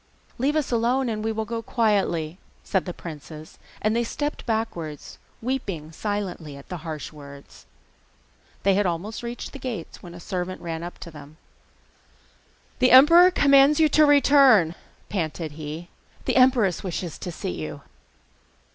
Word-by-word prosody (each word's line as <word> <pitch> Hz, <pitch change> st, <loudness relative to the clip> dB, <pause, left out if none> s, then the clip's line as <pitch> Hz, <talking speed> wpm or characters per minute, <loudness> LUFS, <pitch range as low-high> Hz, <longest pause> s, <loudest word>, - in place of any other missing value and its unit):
'Leave 280 Hz, +4 st, +1 dB
us 305 Hz, -4 st, 0 dB
alone, 245 Hz, +3 st, +1 dB
and 215 Hz, -1 st, -3 dB
we 225 Hz, -, 0 dB
will 220 Hz, 0 st, -3 dB
go 230 Hz, 0 st, -4 dB
quietly,' 195 Hz, -8 st, 0 dB, 0.2 s
said 190 Hz, -3 st, 0 dB
the 180 Hz, -, -4 dB
princes, 155 Hz, -2 st, -10 dB, 0.2 s
and 215 Hz, +1 st, +2 dB
stepped 295 Hz, 0 st, -4 dB
backwards, 175 Hz, -, -4 dB, 0.2 s
weeping 200 Hz, -, -3 dB
silently 180 Hz, -6 st, -4 dB
at 140 Hz, -, -14 dB
the 180 Hz, -, -4 dB
harsh 155 Hz, -2 st, -7 dB
words. 140 Hz, -1 st, -13 dB, 1.0 s
They 195 Hz, -, +4 dB
had 200 Hz, 0 st, +2 dB
almost 180 Hz, +6 st, -4 dB
reached 240 Hz, 0 st, -6 dB
the 280 Hz, -, -8 dB
gates 235 Hz, -10 st, -6 dB
when 175 Hz, -1 st, -11 dB
a -, -, -10 dB
servant 180 Hz, +1 st, -4 dB
ran 165 Hz, -1 st, -5 dB
up 175 Hz, +1 st, -7 dB
to 170 Hz, -, -8 dB
them. 150 Hz, 0 st, -13 dB, 1.4 s
'The 255 Hz, 0 st, +4 dB
emperor 335 Hz, +8 st, +8 dB
commands 280 Hz, -3 st, +5 dB
you 315 Hz, -1 st, +5 dB
to 305 Hz, +1 st, +5 dB
return,' 275 Hz, -, +5 dB, 0.3 s
panted 165 Hz, -4 st, -3 dB
he: 155 Hz, +3 st, -7 dB, 0.4 s
'the -, -, 0 dB
empress 250 Hz, -, +3 dB
wishes 175 Hz, -3 st, -5 dB
to 180 Hz, -, -5 dB
see 160 Hz, -, -5 dB
you. 80 Hz, -2 st, -6 dB
195 Hz, 150 wpm, -24 LUFS, 165-250 Hz, 1.4 s, emperor